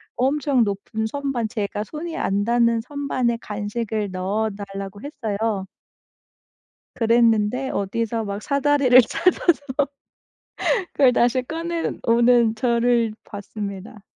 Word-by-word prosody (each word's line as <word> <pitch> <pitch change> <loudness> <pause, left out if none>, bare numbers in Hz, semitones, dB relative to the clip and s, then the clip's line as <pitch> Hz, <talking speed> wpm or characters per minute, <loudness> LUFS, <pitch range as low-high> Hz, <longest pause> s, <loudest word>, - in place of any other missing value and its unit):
엄청 270 -1 +2
높은 205 +2 -3
선반 270 -3 -2
제가 210 -1 -3
손이 320 +8 -6
안 200 +1 0
닿는 235 0 +3
선반에 255 -3 -1
간식을 210 0 -3
넣어 200 +4 -1
달라고 195 0 -7
했어요. 220 -7 -3 1.3
그랬는데 230 +2 +2
어디서 225 +3 -2
막 200 +1 -5
사다리를 280 -3 +5
찾아서 345 +4 +2 1.3
그걸 260 -3 +4
다시 245 +2 +2
꺼내 330 +4 -3
오는 235 -1 +4
저를 235 -1 +2
봤습니다. 205 0 -7
230 Hz, 235 characters per minute, -22 LUFS, 210-255 Hz, 1.3 s, 사다리를